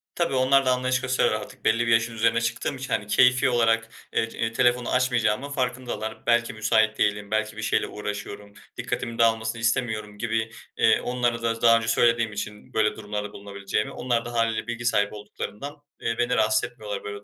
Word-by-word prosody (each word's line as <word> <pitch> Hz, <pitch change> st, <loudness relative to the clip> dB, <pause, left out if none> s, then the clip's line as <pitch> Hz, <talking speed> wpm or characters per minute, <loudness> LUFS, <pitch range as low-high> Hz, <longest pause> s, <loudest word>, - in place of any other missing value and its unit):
Tabii, 170 Hz, -6 st, 0 dB
onlar 130 Hz, +1 st, +4 dB
da 130 Hz, -, +3 dB
anlayış 130 Hz, 0 st, +1 dB
gösteriyorlar 130 Hz, -4 st, +1 dB
artık, 130 Hz, +1 st, -12 dB
belli 115 Hz, +2 st, +2 dB
bir -, -, +2 dB
yaşın 115 Hz, +1 st, +2 dB
üzerine 115 Hz, +1 st, +2 dB
çıktığım 115 Hz, +4 st, -2 dB
için. 130 Hz, -1 st, -4 dB
Hani, 105 Hz, -, -1 dB
keyfi 125 Hz, +5 st, +4 dB
olarak, 115 Hz, -2 st, +2 dB, 0.2 s
eee, 115 Hz, -, +1 dB
eee, 115 Hz, 0 st, -2 dB
telefonu 120 Hz, 0 st, +2 dB
açmayacağımın 125 Hz, 0 st, +1 dB
farkındalar. 125 Hz, -4 st, -3 dB
Belki 120 Hz, 0 st, +2 dB
müsait 110 Hz, 0 st, +2 dB
değilim, 105 Hz, 0 st, 0 dB
belki 110 Hz, 0 st, -1 dB
bir -, -, -5 dB
şeyle 110 Hz, -, +1 dB
uğraşıyorum, 105 Hz, 0 st, -6 dB, 0.2 s
dikkatimin 125 Hz, -1 st, -3 dB
dağılmasını 115 Hz, 0 st, +2 dB
istemiyorum 110 Hz, -3 st, -1 dB
gibi. 110 Hz, 0 st, -2 dB, 0.3 s
Eee, -, -, +4 dB
onlara 120 Hz, -1 st, -1 dB
da 115 Hz, -1 st, -1 dB
daha 115 Hz, -1 st, +6 dB
önce 115 Hz, -1 st, -3 dB
söylediğim 115 Hz, -1 st, +2 dB
için 105 Hz, +4 st, -7 dB
böyle 110 Hz, -1 st, +2 dB
durumlarda 105 Hz, -1 st, -5 dB
bulunabileceğimi, 100 Hz, +1 st, -3 dB
onlar 120 Hz, -1 st, -1 dB
da 120 Hz, -, -6 dB
hâliyle 115 Hz, -1 st, 0 dB
bilgi 120 Hz, 0 st, -4 dB
sahibi 105 Hz, -4 st, +2 dB
olduklarından, 105 Hz, +7 st, -7 dB, 0.2 s
eee, 115 Hz, 0 st, -1 dB
beni 120 Hz, +1 st, +1 dB
rahatsız 125 Hz, +3 st, +2 dB
etmiyorlar, 105 Hz, -4 st, -6 dB
böyle 100 Hz, 0 st, -7 dB
115 Hz, 180 wpm, -25 LUFS, 110-125 Hz, 0.3 s, daha